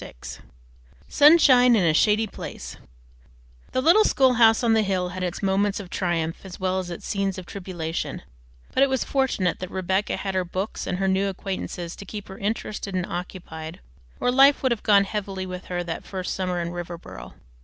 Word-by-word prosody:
VI -, -, -11 dB, 0.9 s
SUNSHINE 275 Hz, -5 st, +6 dB
IN 205 Hz, -, +3 dB
A 165 Hz, -2 st, +3 dB
SHADY 210 Hz, +6 st, +3 dB
PLACE -, -, -8 dB, 0.9 s
The 255 Hz, -, 0 dB
little 355 Hz, +8 st, +6 dB
schoolhouse 245 Hz, -, +4 dB
on 230 Hz, -1 st, +3 dB
the 220 Hz, -, +4 dB
hill 190 Hz, -3 st, -1 dB
had 185 Hz, +1 st, -6 dB
its 180 Hz, +2 st, -4 dB
moments 195 Hz, +1 st, +1 dB
of 190 Hz, -3 st, -9 dB
triumph 165 Hz, -3 st, -2 dB
as 190 Hz, -2 st, -10 dB
well 185 Hz, 0 st, 0 dB
as 185 Hz, -1 st, -5 dB
its 175 Hz, -, -7 dB
scenes 195 Hz, -1 st, -1 dB
of 185 Hz, -, -7 dB
tribulation, 175 Hz, -4 st, -5 dB, 0.5 s
but -, -, +2 dB
it 275 Hz, -, +5 dB
was 265 Hz, -1 st, 0 dB
fortunate 255 Hz, -, 0 dB
that 185 Hz, -, -5 dB
Rebecca 190 Hz, +2 st, -1 dB
had 195 Hz, -1 st, -3 dB
her 185 Hz, -1 st, +1 dB
books 185 Hz, +4 st, -4 dB
and 180 Hz, -, -2 dB
her 195 Hz, +1 st, 0 dB
new 190 Hz, +1 st, +1 dB
acquaintances 185 Hz, -2 st, -5 dB
to -, -, -8 dB
keep 205 Hz, +1 st, -8 dB
her 190 Hz, -, -9 dB
interested 205 Hz, -1 st, -3 dB
and 180 Hz, -1 st, 0 dB
occupied, 165 Hz, -3 st, -7 dB, 0.4 s
or 245 Hz, -, +1 dB
life 275 Hz, +3 st, +5 dB
would 260 Hz, -, +2 dB
have 235 Hz, -, -1 dB
gone 200 Hz, -2 st, +5 dB
heavily 195 Hz, -2 st, -4 dB
with 180 Hz, 0 st, -7 dB
her 175 Hz, -1 st, -3 dB
that 165 Hz, -1 st, -5 dB
first 185 Hz, -2 st, -4 dB
summer 180 Hz, -2 st, -2 dB
in 170 Hz, 0 st, -3 dB
Riverboro. 170 Hz, -, -8 dB
190 Hz, 190 wpm, -24 LUFS, 180-215 Hz, 0.9 s, SUNSHINE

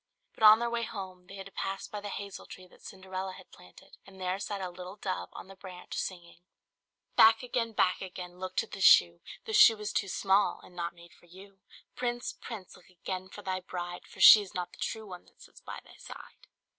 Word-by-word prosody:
But -, -, -18 dB
on 215 Hz, 0 st, +9 dB
their 235 Hz, +1 st, -1 dB
way 235 Hz, 0 st, -1 dB
home 190 Hz, -5 st, -7 dB
they 195 Hz, -, -11 dB
had 195 Hz, -1 st, -8 dB
to 195 Hz, -, -12 dB
pass 195 Hz, 0 st, -4 dB
by 210 Hz, -, -7 dB
the 205 Hz, -, -6 dB
hazel 200 Hz, -1 st, -7 dB
tree 185 Hz, -, -11 dB
that 180 Hz, -, -21 dB
Cinderella 190 Hz, 0 st, -6 dB
had -, -, -15 dB
planted 90 Hz, 0 st, -17 dB
and 190 Hz, -1 st, -16 dB
there 185 Hz, +1 st, -2 dB
sat 205 Hz, 0 st, -4 dB
a 185 Hz, -2 st, -4 dB
little 180 Hz, +2 st, -9 dB
dove 90 Hz, -, -4 dB
on -, -, -10 dB
the 195 Hz, -, -13 dB
branch 185 Hz, -2 st, -10 dB
singing 175 Hz, -2 st, -5 dB, 0.8 s
"Back 225 Hz, +1 st, +7 dB
again! 235 Hz, -2 st, -2 dB
back 185 Hz, -3 st, +2 dB
again! 180 Hz, -1 st, -8 dB
look 185 Hz, 0 st, -6 dB
to -, -, +1 dB
the 195 Hz, -, -9 dB
shoe! 85 Hz, -, +6 dB, 0.2 s
The 445 Hz, -, -5 dB
shoe 330 Hz, -, +8 dB
is 210 Hz, 0 st, -5 dB
too 200 Hz, -, 0 dB
small, 195 Hz, +2 st, +2 dB
and 180 Hz, -, -16 dB
not 170 Hz, 0 st, -4 dB
made 170 Hz, 0 st, -16 dB
for 175 Hz, -, -22 dB
you! 195 Hz, +3 st, -15 dB, 0.4 s
Prince! 240 Hz, 0 st, -3 dB
prince! 210 Hz, -6 st, -9 dB
look 180 Hz, -, -20 dB
again 185 Hz, +1 st, -6 dB
for -, -, -11 dB
thy 185 Hz, -1 st, -2 dB
bride, 175 Hz, -1 st, -7 dB
For -, -, -15 dB
she's 205 Hz, -2 st, +8 dB
not 180 Hz, -1 st, -3 dB
the -, -, -17 dB
true 220 Hz, -1 st, -4 dB
one 180 Hz, -3 st, -10 dB
that -, -, -26 dB
sits -, -, -16 dB
by -, -, -8 dB
thy -, -, -17 dB
side." -, -, -12 dB
190 Hz, 225 wpm, -30 LUFS, 180-205 Hz, 0.8 s, on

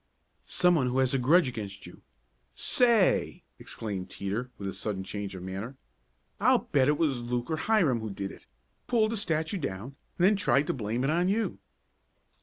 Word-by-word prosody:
"Some 180 Hz, -1 st, +3 dB
one 140 Hz, -7 st, +2 dB
who 125 Hz, +1 st, -1 dB
has 130 Hz, 0 st, +2 dB
a 135 Hz, -, +2 dB
grudge 155 Hz, +6 st, +4 dB
against 100 Hz, -5 st, -6 dB
you -, -, -13 dB, 0.5 s
Say!" 235 Hz, -6 st, +2 dB, 0.2 s
exclaimed 100 Hz, -4 st, -5 dB
Teeter 105 Hz, +6 st, -4 dB
with 100 Hz, -, -5 dB
a 95 Hz, -, -3 dB
sudden 100 Hz, -3 st, -3 dB
change 100 Hz, 0 st, -5 dB
of 90 Hz, -, -8 dB
manner. 100 Hz, +8 st, -6 dB, 0.6 s
"I'll -, -, +3 dB
bet 130 Hz, -2 st, +4 dB
it 150 Hz, 0 st, +3 dB
was 140 Hz, -7 st, +1 dB
Luke 120 Hz, +4 st, -3 dB
or 160 Hz, -, 0 dB
Hiram 160 Hz, -, +2 dB
who 110 Hz, -1 st, -5 dB
did 100 Hz, -1 st, -5 dB
it -, -, -15 dB, 0.4 s
pulled 225 Hz, -3 st, +2 dB
the -, -, -1 dB
statue 165 Hz, -2 st, -1 dB
down 120 Hz, -, -5 dB, 0.2 s
and 175 Hz, -, +3 dB
then 205 Hz, +2 st, +5 dB
tried 150 Hz, -7 st, +2 dB
to -, -, -1 dB
blame 115 Hz, 0 st, -2 dB
it 135 Hz, -, +1 dB
on 175 Hz, +3 st, +2 dB
you." 220 Hz, +3 st, -1 dB
130 Hz, 190 wpm, -28 LUFS, 105-170 Hz, 0.6 s, then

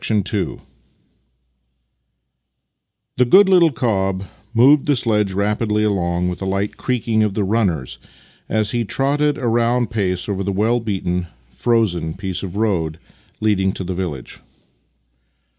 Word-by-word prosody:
II 105 Hz, -2 st, 0 dB, 2.6 s
The 125 Hz, -, +5 dB
gooc 190 Hz, +9 st, +7 dB
little 175 Hz, -4 st, +5 dB
cob 95 Hz, -7 st, -1 dB, 0.3 s
moved 135 Hz, +5 st, +5 dB
the 145 Hz, -, +3 dB
sledge 105 Hz, -5 st, +1 dB
rapidly 105 Hz, +2 st, 0 dB
along 90 Hz, -4 st, 0 dB
with 90 Hz, +1 st, -4 dB
a -, -, -3 dB
light 100 Hz, +2 st, -2 dB
creaking 120 Hz, -3 st, -1 dB
of 105 Hz, -2 st, 0 dB
the 105 Hz, -, 0 dB
runners 90 Hz, -, -1 dB, 0.5 s
as 110 Hz, -1 st, 0 dB
he 120 Hz, -1 st, 0 dB
trotted 145 Hz, +7 st, 0 dB
at -, -, -8 dB
a -, -, +1 dB
round 120 Hz, +1 st, +1 dB
pace 95 Hz, -5 st, -1 dB
over 100 Hz, -2 st, -2 dB
the 100 Hz, -, -1 dB
well 110 Hz, +5 st, +1 dB
beaten, 90 Hz, -5 st, -2 dB, 0.2 s
frozen 90 Hz, -9 st, 0 dB
piece 95 Hz, -1 st, -4 dB
of 95 Hz, -2 st, -6 dB
road 90 Hz, -8 st, 0 dB, 0.4 s
leading 95 Hz, -3 st, +1 dB
to -, -, -5 dB
the 90 Hz, +1 st, -4 dB
village. 85 Hz, -9 st, -5 dB
105 Hz, 140 wpm, -19 LUFS, 95-115 Hz, 2.6 s, gooc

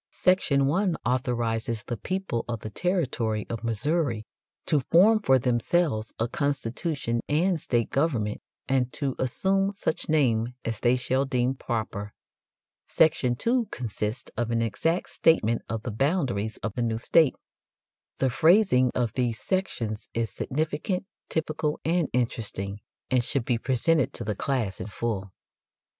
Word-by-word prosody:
Section 165 Hz, -7 st, +3 dB
1 180 Hz, +5 st, +2 dB
authorizes 120 Hz, -2 st, -1 dB
the 120 Hz, -, -3 dB
people 185 Hz, -, -2 dB
of 115 Hz, -3 st, -4 dB
the 110 Hz, -, -6 dB
territory 125 Hz, -, -1 dB
of 115 Hz, -, -4 dB
Missouri 115 Hz, 0 st, 0 dB, 0.4 s
"to 150 Hz, -, +3 dB
form 190 Hz, -, +5 dB
for 135 Hz, -11 st, +4 dB
themselves 125 Hz, -1 st, +1 dB
a 115 Hz, -, 0 dB
constitution 140 Hz, -2 st, -1 dB
and 165 Hz, +2 st, +2 dB
state 120 Hz, -2 st, 0 dB
government, 130 Hz, -8 st, 0 dB, 0.3 s
and 130 Hz, -2 st, +1 dB
to 140 Hz, -3 st, -1 dB
assume 195 Hz, +10 st, +1 dB
such 195 Hz, -6 st, -2 dB
name 125 Hz, -6 st, +2 dB
as 115 Hz, -1 st, -2 dB
they 120 Hz, +1 st, +3 dB
shall 130 Hz, +2 st, 0 dB
deem 125 Hz, -1 st, +1 dB
proper." 110 Hz, -5 st, -4 dB, 0.7 s
Section 135 Hz, -6 st, +3 dB
2 235 Hz, -, +1 dB
consists 110 Hz, -, -4 dB
of 120 Hz, -1 st, -1 dB
an 115 Hz, 0 st, +1 dB
exact 165 Hz, -, -1 dB
statement 115 Hz, -8 st, +3 dB
of 110 Hz, -1 st, -3 dB
the 120 Hz, -, -3 dB
boundaries 120 Hz, -, 0 dB
of 110 Hz, -, -2 dB
the 120 Hz, -, -2 dB
new 115 Hz, -1 st, 0 dB
state. 145 Hz, +5 st, +4 dB, 0.8 s
The 130 Hz, -1 st, +1 dB
phrasing 160 Hz, -, +5 dB
of 120 Hz, -3 st, 0 dB
these 120 Hz, -3 st, -1 dB
sections 115 Hz, -, -2 dB
is 115 Hz, -3 st, -1 dB
significant, 155 Hz, -, -2 dB, 0.2 s
typical, 155 Hz, -1 st, -1 dB
and 165 Hz, -1 st, +2 dB
interesting, 105 Hz, -5 st, -2 dB, 0.3 s
and 125 Hz, -2 st, +3 dB
should 130 Hz, 0 st, -1 dB
be 120 Hz, -2 st, +1 dB
presented 130 Hz, +4 st, +1 dB
to -, -, -4 dB
the 105 Hz, -1 st, -1 dB
class 115 Hz, -6 st, -1 dB
in 90 Hz, -, -4 dB
full. 105 Hz, -3 st, -3 dB
125 Hz, 145 wpm, -27 LUFS, 115-155 Hz, 0.8 s, form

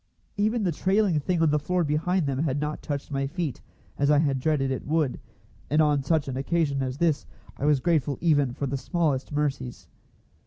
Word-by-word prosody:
Even 215 Hz, +2 st, +1 dB
the 180 Hz, -, +1 dB
trailing 190 Hz, 0 st, +2 dB
thing 165 Hz, +3 st, 0 dB
on 155 Hz, -, +4 dB
the 150 Hz, -, +2 dB
floor 180 Hz, +4 st, 0 dB
behind 160 Hz, +4 st, +1 dB
them 135 Hz, -2 st, -1 dB
had 145 Hz, -2 st, 0 dB
not 150 Hz, +1 st, -3 dB
touched 145 Hz, 0 st, -4 dB
my 135 Hz, -1 st, -1 dB
feet, 165 Hz, -, -4 dB, 0.4 s
as 140 Hz, 0 st, +2 dB
I 150 Hz, -, +5 dB
had 140 Hz, -3 st, +2 dB
dreaded 135 Hz, -1 st, +1 dB
it 130 Hz, -, -4 dB
would, 155 Hz, -4 st, 0 dB, 0.5 s
and 150 Hz, +3 st, +2 dB
on 150 Hz, -2 st, +3 dB
such 155 Hz, +1 st, +1 dB
an 130 Hz, -, -3 dB
occasion 140 Hz, -1 st, 0 dB
as 130 Hz, 0 st, -3 dB
this 160 Hz, -2 st, +1 dB, 0.3 s
I 140 Hz, -, -2 dB
was 150 Hz, -2 st, +4 dB
grateful 145 Hz, -3 st, +1 dB
even 145 Hz, -6 st, +2 dB
for 140 Hz, -, -2 dB
the 135 Hz, +1 st, -2 dB
smallest 150 Hz, -2 st, -1 dB
mercies. 140 Hz, -4 st, -2 dB
150 Hz, 200 wpm, -26 LUFS, 135-165 Hz, 0.5 s, I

